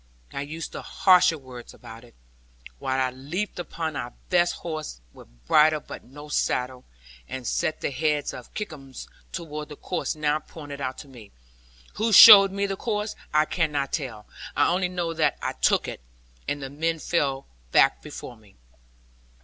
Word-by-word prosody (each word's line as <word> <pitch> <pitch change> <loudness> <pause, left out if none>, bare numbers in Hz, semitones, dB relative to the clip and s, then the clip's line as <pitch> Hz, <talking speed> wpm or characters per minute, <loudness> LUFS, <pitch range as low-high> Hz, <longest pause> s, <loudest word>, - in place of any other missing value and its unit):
I 140 - -3
use 155 +2 -6
no - - -6
harsher 180 -3 +4
word 130 -4 -12
about 115 +1 -12
it, 120 - -19 0.6
while 130 0 -1
I 130 -1 +1
leaped 155 +11 -5
upon 160 -2 -4
our 120 -3 -5 0.2
best 175 -1 +3
horse, 155 - -6
with - - -15 0.2
bridle 155 - +5
but - - -10
no 145 +3 -12
saddle, 125 -3 -1 0.4
and 130 -1 -6
set 155 - -1
the - - -2
head 150 +1 -1
of 125 - -10
Kickums 150 -11 -7 0.2
towards 150 -3 -6
the 150 - -8
course 180 +2 -3
now 150 0 0
pointed 145 -3 -10
out 130 -1 -3
to - - -19
me. 120 -6 -14 0.7
Who 220 +3 +1
showed 195 -1 +11
me 200 +1 -1
the 195 -1 -2
course, 210 0 -3 0.2
I 155 0 +3
cannot 150 -5 -1
tell. 120 -9 -4 0.3
I 145 - +3
only 180 +1 +1
know 175 -2 -3
that 155 -2 +1
I - - -3
took - - +1
it. - - -7 0.5
And 145 -1 -3
the 135 - -6
men 165 +3 -1
fell 140 -5 -1 0.3
back - - +4
before 120 - -9
me. 105 -3 -22
150 Hz, 170 wpm, -25 LUFS, 130-170 Hz, 0.7 s, showed